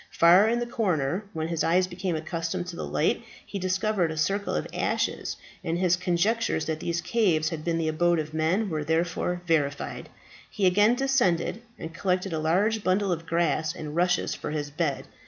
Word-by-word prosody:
Far 180 +6 +6
in 235 - +1
the 240 - -1
corner, 190 - -1
when 160 0 -3
his 165 -2 -1
eyes 180 +3 +3
became 180 -1 -3
accustomed 165 +2 -3
to 175 - -7
the - - -5
light, - - 0 0.2
he 200 - -5
discovered 185 -1 0
a 160 - -5
circle 200 +5 0
of 75 - -1
ashes, - - -1 0.3
and 165 +1 -1
his 180 -1 +3
conjectures 180 +2 0
that 160 -1 -2
these 170 +1 -2
caves 175 -10 +2
had 160 -2 -5
been 170 0 0
the 165 -1 -1
abode 175 +2 +2
of 155 -1 -3
men 170 +6 +1
were 155 -1 -1
therefore 170 +2 -1
verified. 145 -4 -1 0.4
He 205 - -1
again 205 +6 +5
descended, 245 -7 +1 0.2
and 160 +1 -7
collected 185 0 -1
a 160 - -1
large 200 +8 +1
bundle 190 +1 +1
of 165 -1 -3
grass 165 -2 0
and 150 -1 -6
rushes 180 +1 +1
for - - -5
his 150 -1 -3
bed. 150 -2 -1
175 Hz, 190 wpm, -27 LUFS, 160-195 Hz, 0.4 s, Far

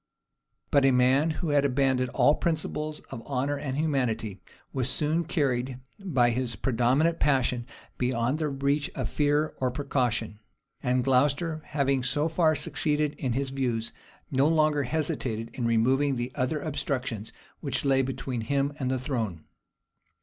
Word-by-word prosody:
But 140 - +4
a 135 - +6
man 130 +4 +4
who 160 +1 -2
had 145 -1 +3
abandoned 130 -2 +2
all 145 - +4
principles 155 -2 -2
of 115 - -6
honor 140 +1 -1
and 140 -1 -4
humanity, 115 - -1 0.3
was 130 -2 0
soon 155 +5 +1
carried 130 -5 0 0.2
by 130 -12 +2
his 120 -1 -1
predominant 130 - +2
passion 125 -4 +1 0.3
beyond 125 +3 0
the 155 -2 0
reach 140 +1 0
of 130 -4 -3
fear 150 +1 +1
or 130 - +2
precaution; 125 -5 -1 0.4
and 125 -1 +1
Glocester, 145 +5 +2
having 140 -2 +1
so 145 +5 0
far 160 -1 +2
succeeded 150 0 0
in 130 -3 -1
his 135 +1 -1
views, 120 -4 -2 0.4
no 135 +1 +3
longer 155 -2 +3
hesitated 130 -6 -2
in 120 -3 -2
removing 130 +5 +2
the 120 +1 -3
other 140 +3 -1
obstructions 130 -7 -3 0.3
which - - -2
lay 135 -1 +4
between 130 -2 -3
him 140 +4 0
and 130 -2 -1
the 130 - +1
throne. 115 - -3
135 Hz, 150 wpm, -27 LUFS, 125-150 Hz, 0.4 s, a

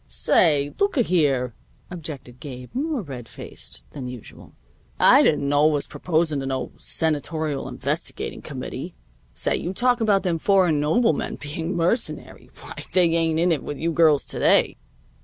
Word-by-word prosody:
"Say, 145 -4 +2
looka 400 -11 +2
here," 140 - +1 0.4
objected 150 -7 -8
Gabe, 125 -3 -9
more 285 -2 -2
red 125 -7 -8
faced - - -8
than 135 -4 -6
usual, 125 -3 -10 0.4
"I - - +7
didn't 145 -2 +2
know 145 +2 +4
was 150 -2 0
proposing 160 -3 -1
to 135 - -4
no 130 -2 -3
Senatorial 155 -1 -2
investigating - - -4
committee. - - -7 0.4
Say, - - 0
you 180 - -4
talk 245 +1 +2
about 200 -3 +3
them 170 -4 0
foreign 180 -5 +3
noblemen 160 +4 +1
being 160 +4 -4
mercenary! 175 +9 -2
Why, - - -9 0.2
they 180 -2 +4
ain't 165 -1 +1
in 175 +2 +2
it 160 - +1
with 145 - -6
you 165 +3 -1
girls 155 -3 +4
to - - -5
day. - - +3
160 Hz, 155 wpm, -23 LUFS, 145-180 Hz, 0.4 s, I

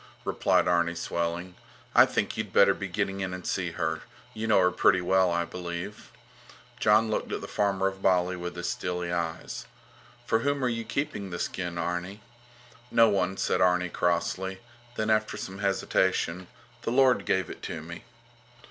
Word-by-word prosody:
replied - - +2
Arni, 85 0 +2
swelling. 85 +2 -3 0.4
I - - +8
think - - -1
you'd - - -4
better - - +6
be - - -5
getting 95 0 -2
in 95 -1 -3
and 90 - -9
see 90 -3 -1
her. 80 -2 -2 0.3
You 110 +1 -3
know 110 - +5
her 90 -1 +4
pretty 95 +1 +4
well, 95 +1 +3
I 85 0 0
believe. 90 +4 -6 0.7
Jon 110 +1 +4
looked - - -2
at - - -2
the - - -6
farmer 100 -2 0
of 95 0 -2
Bali 90 -1 +2
with 90 0 -6
his 85 0 -4
steely 90 -1 -2
eyes. 85 -2 -3 0.6
For 115 - +2
whom 140 +2 0
are - - +2
you 115 -1 -3
keeping 140 -9 -3
the 85 - -4
skin, 90 -1 -3
Arni? 90 +4 -3 0.7
No 115 -2 +5
one, 95 -2 0
said - - +1
Arni, 90 0 +3
crossly; 90 +2 -1 0.4
then 110 0 0
after 110 0 +1
some 95 +1 -6
hesitation: 95 -2 0 0.3
The - - -3
Lord 130 0 +4
gave 95 -2 0
it - - -10
to 80 -2 -5
me. 85 +6 -9
95 Hz, 175 wpm, -28 LUFS, 85-100 Hz, 0.7 s, I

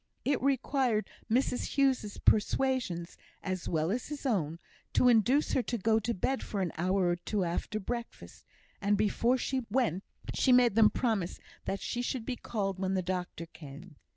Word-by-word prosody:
It 280 0 +1
required 265 -4 +1 0.2
Mrs 250 +2 0
Hughes's 265 -7 +1
persuasions, 210 -6 +1 0.3
as 185 -2 -3
well 160 +2 0
as 240 +3 -2
his 295 -1 -7
own, 165 - 0 0.4
to 250 - +4
induce 245 +5 +4
her - - +3
to 240 0 -3
go 220 +2 +2
to 230 +2 -2
bed 265 +8 -1
for 205 - -4
an 175 -3 -1
hour 185 +2 +1
or 175 - +1
two 195 +3 -2
after 175 +5 -2
breakfast; 235 +3 -6 0.4
and, 205 +1 +2
before 230 +4 +2
she 260 0 -1
went, 205 -6 +1 0.3
she 260 - +3
made 245 -3 +6
them 220 0 +6
promise 215 -8 -1 0.3
that 195 - -2
she 245 - -2
should 245 -1 -3
be 255 - -2
called 195 -6 -3
when 190 0 0
the 185 - 0
doctor 180 -2 -3
came. 155 +1 -12
215 Hz, 175 wpm, -31 LUFS, 185-250 Hz, 0.4 s, made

